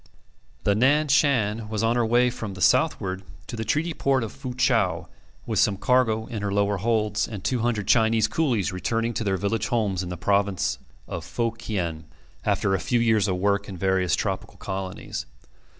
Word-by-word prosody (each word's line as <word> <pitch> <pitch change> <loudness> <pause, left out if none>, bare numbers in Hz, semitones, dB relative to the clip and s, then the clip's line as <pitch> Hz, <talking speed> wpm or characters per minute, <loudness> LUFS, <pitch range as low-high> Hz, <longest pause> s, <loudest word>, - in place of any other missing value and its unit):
The 100 - +3
Nan 145 +7 +3
Shan 115 -7 +2
was 110 0 -2
on 115 +1 +2
her 120 - +2
way 120 +2 +3
from 105 -4 -6
the - - -9
southward 95 +2 +2 0.2
to - - -7
the 110 - -3
treaty 155 +10 0
port 135 -4 +1
of 110 - -5
Fu 130 -3 -7
chau, - - +1 0.4
with - - -1
some 100 -2 +3
cargo 115 -2 +2
in 110 -3 -5
her 100 -1 -2
lower 100 0 +1
holds, 105 0 0
and 105 -5 -7
two 125 - 0
hundred 115 -3 -1
Chinese 110 -2 +4
coolies 120 - 0
returning 115 +6 -1
to 115 - -2
their 95 -2 0
village 100 +4 -1
homes 105 -7 0
in 90 - -5
the 90 - -5
province 100 0 +1 0.3
of - - -5
Fo 115 -1 -1
kien, 90 -9 -4 0.4
after 95 - +1
a 95 - +1
few 120 +8 +1
years 110 -3 +3
of 95 -2 0
work 100 +1 0
in 95 - -7
various 95 -2 +1
tropical - - -3
colonies. 95 -8 -5
110 Hz, 190 wpm, -25 LUFS, 95-120 Hz, 0.4 s, Chinese